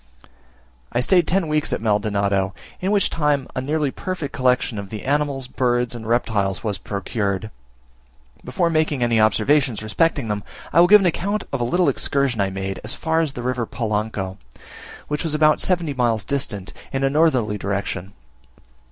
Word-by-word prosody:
I -, -, 0 dB
stayed 175 Hz, +6 st, +3 dB
ten 185 Hz, -1 st, +1 dB
weeks 150 Hz, -1 st, 0 dB
at -, -, 0 dB
Maldonado, 100 Hz, -2 st, 0 dB, 0.2 s
in 185 Hz, -, -1 dB
which 205 Hz, -1 st, +2 dB
time 145 Hz, -4 st, +1 dB
a 130 Hz, -, -1 dB
nearly 150 Hz, +1 st, 0 dB
perfect 170 Hz, -7 st, -5 dB
collection 125 Hz, -3 st, +1 dB
of 100 Hz, -1 st, -7 dB
the 110 Hz, -1 st, -6 dB
animals, 140 Hz, -2 st, 0 dB
birds, 125 Hz, -1 st, 0 dB
and 115 Hz, -2 st, -7 dB
reptiles, 110 Hz, -5 st, 0 dB
was 105 Hz, -4 st, -2 dB
procured. 100 Hz, +1 st, -3 dB, 0.9 s
Before 175 Hz, -3 st, 0 dB
making 155 Hz, -5 st, +1 dB
any 115 Hz, -2 st, +3 dB
observations 115 Hz, +2 st, +2 dB
respecting 125 Hz, +4 st, +1 dB
them, 105 Hz, -1 st, -2 dB, 0.3 s
I -, -, +5 dB
will 175 Hz, -, +7 dB
give 210 Hz, +2 st, +8 dB
an -, -, +1 dB
account 200 Hz, +4 st, 0 dB
of 135 Hz, -, -1 dB
a -, -, +1 dB
little 175 Hz, +8 st, +2 dB
excursion 140 Hz, -6 st, +1 dB
I 100 Hz, -, +1 dB
made 95 Hz, 0 st, -4 dB
as 115 Hz, +5 st, -2 dB
far 160 Hz, 0 st, 0 dB
as 155 Hz, -4 st, 0 dB
the 120 Hz, -, -6 dB
river 125 Hz, -2 st, -1 dB
Polanco, 105 Hz, -4 st, -3 dB, 0.7 s
which 150 Hz, 0 st, -2 dB
is 160 Hz, -2 st, -1 dB
about 155 Hz, 0 st, +4 dB
seventy 175 Hz, -5 st, +1 dB
miles 120 Hz, -5 st, 0 dB
distant, 105 Hz, -9 st, -2 dB, 0.2 s
in 135 Hz, 0 st, -1 dB
a 135 Hz, -, +3 dB
northerly 130 Hz, -9 st, +2 dB
direction. 100 Hz, -1 st, -3 dB
125 Hz, 170 wpm, -22 LUFS, 105-150 Hz, 0.9 s, give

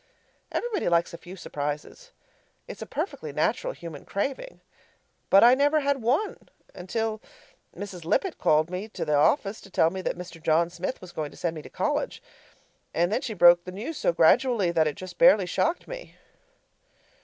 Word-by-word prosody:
Everybody 465 Hz, -, -1 dB
likes 170 Hz, 0 st, +1 dB
a -, -, -6 dB
few 180 Hz, +2 st, -10 dB
surprises; 150 Hz, -, -5 dB, 0.6 s
it's -, -, -9 dB
a -, -, -6 dB
perfectly -, -, -4 dB
natural -, -, 0 dB
human 165 Hz, -, -9 dB
craving. 270 Hz, -, -4 dB, 0.7 s
But 195 Hz, -, +7 dB
I 240 Hz, +1 st, +8 dB
never 290 Hz, +3 st, +3 dB
had 280 Hz, -2 st, 0 dB
one 270 Hz, -, -1 dB, 0.2 s
until 220 Hz, +4 st, -3 dB, 0.6 s
Mrs. 190 Hz, -4 st, -7 dB
Lippett 260 Hz, -, 0 dB
called 155 Hz, +2 st, +3 dB
me 185 Hz, +4 st, -4 dB
to 220 Hz, -, -5 dB
the 150 Hz, -, 0 dB
office 195 Hz, -, +2 dB
to 195 Hz, -, -14 dB
tell 165 Hz, -3 st, +3 dB
me 190 Hz, +1 st, -5 dB
that 185 Hz, -, -3 dB
Mr. 180 Hz, -2 st, -9 dB
John 165 Hz, +2 st, +2 dB
Smith 180 Hz, +8 st, -4 dB
was 185 Hz, -1 st, -10 dB
going 155 Hz, -3 st, -4 dB
to -, -, -16 dB
send 170 Hz, -2 st, -2 dB
me 155 Hz, -, -6 dB
to -, -, -12 dB
college. -, -, -2 dB, 0.7 s
And 175 Hz, +3 st, +2 dB
then 235 Hz, -, 0 dB
she 225 Hz, -4 st, -4 dB
broke 175 Hz, -1 st, +7 dB
the 185 Hz, -, -7 dB
news 230 Hz, -, -6 dB
so -, -, +2 dB
gradually 190 Hz, +4 st, +3 dB
that 160 Hz, -2 st, +2 dB
it 150 Hz, -, -2 dB
just 185 Hz, -1 st, -10 dB
barely 250 Hz, -7 st, +6 dB
shocked 330 Hz, -, -1 dB
me. -, -, -9 dB
185 Hz, 180 wpm, -26 LUFS, 170-255 Hz, 0.7 s, I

